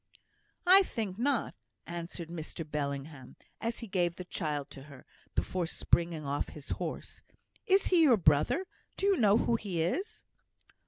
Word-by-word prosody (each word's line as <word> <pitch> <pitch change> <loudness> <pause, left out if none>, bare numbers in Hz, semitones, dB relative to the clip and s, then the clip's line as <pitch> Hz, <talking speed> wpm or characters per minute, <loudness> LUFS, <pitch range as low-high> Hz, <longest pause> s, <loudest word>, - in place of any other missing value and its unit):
"I 375 +2 +9
think 220 - -3
not," 265 -1 +1 0.3
answered 170 0 -6
Mr 165 -1 -6
Bellingham, 140 -2 -4 0.2
as 230 +1 -3
he 230 - -6
gave 175 -3 0
the 180 - -7
child 150 -6 -3
to 135 - -10
her, 140 -3 -14 0.3
before 180 -2 -1
springing 170 -2 0
off 140 +1 -2
his 150 -2 -10
horse. - - -5 0.5
"Is 385 +1 +4
he 355 -3 +5
your 265 -8 +6
brother? 155 - +3 0.3
Do - - -1
you 400 -1 +5
know 210 - +5
who 235 0 +2
he 195 -6 -4
is?" 365 - -3
175 Hz, 155 wpm, -31 LUFS, 150-230 Hz, 0.5 s, I